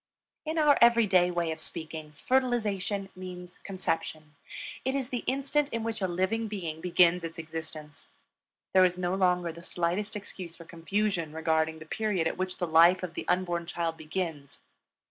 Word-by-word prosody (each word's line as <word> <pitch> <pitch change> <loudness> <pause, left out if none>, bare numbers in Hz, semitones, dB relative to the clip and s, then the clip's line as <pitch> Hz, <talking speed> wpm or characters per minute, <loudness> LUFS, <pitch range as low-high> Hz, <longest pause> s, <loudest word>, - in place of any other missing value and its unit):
In 315 +1 -1
our 300 -2 +5
every 235 -1 +7
day 180 -3 +4
way 170 -2 -1
of 160 0 -6
speaking, 155 -2 -4
fertilization 210 - 0
means 180 -1 -9
conception; 160 -5 -3 0.5
it 265 +1 0
is 265 -3 -2
the 245 -3 -3
instant 280 +2 +1
in 230 -4 -3
which 225 -2 -3
a 190 - +2
living 190 +6 0
being 170 -7 -5
begins 180 0 +4
its 165 0 -6
existence. 155 -2 -7 0.7
There 185 - +7
is 180 -1 +3
no 180 0 -1
longer 180 -2 +2
the 170 +1 -11
slightest 180 +5 -1
excuse 185 -4 -6
for 165 - -11
confusion 170 -1 -1
regarding 160 0 +1
the 155 - -10
period 190 -2 0
at - - -2
which 185 0 -2
the 175 - -1
life 170 +3 +6
of 175 -2 -4
the - - -5
unborn 175 -2 0
child 170 -1 -2
begins. 155 -3 -5
180 Hz, 170 wpm, -29 LUFS, 165-205 Hz, 0.7 s, every